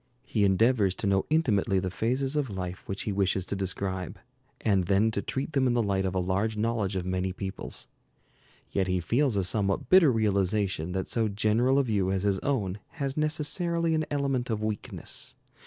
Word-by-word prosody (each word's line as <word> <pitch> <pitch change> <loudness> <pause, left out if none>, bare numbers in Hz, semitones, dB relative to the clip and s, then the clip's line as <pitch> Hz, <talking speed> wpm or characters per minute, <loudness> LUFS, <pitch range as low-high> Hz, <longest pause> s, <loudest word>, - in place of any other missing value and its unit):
He 105 - 0
endeavors 100 0 +3
to - - -4
know 95 -1 +2
intimately 115 -12 +2
the 95 -1 -1
phases 130 - 0
of 145 -4 0
life 90 0 -6
which 95 0 -3
he 105 - -2
wishes 95 -1 +1
to 100 - -3
describe, 95 0 -3 0.4
and 100 -4 +2
then 100 +4 +3
to 100 - -2
treat 135 +7 -3
them 135 -2 +3
in 120 - +2
the 120 - +2
light 95 -2 0
of 95 0 -2
a - - +2
large 100 +4 0
knowledge 110 -3 0
of 90 -1 -2
many 95 0 -1
peoples. 95 +1 -6 0.8
Yet 95 -1 0
he 90 0 +1
feels 120 - +1
a 95 - +2
somewhat 100 +1 0
bitter 185 -6 +7
realization 100 -5 0
that 95 0 -2
so 115 -2 +1
general 110 +6 +2
a 140 - +4
view 105 -6 0
as 95 -1 0
his 100 -2 +1
own 105 -9 -1
has 140 -4 -3
necessarily 160 +2 0
an 155 -1 0
element 135 -4 -1
of 110 -1 -1
weakness. 110 -1 -3
105 Hz, 190 wpm, -28 LUFS, 95-130 Hz, 0.8 s, bitter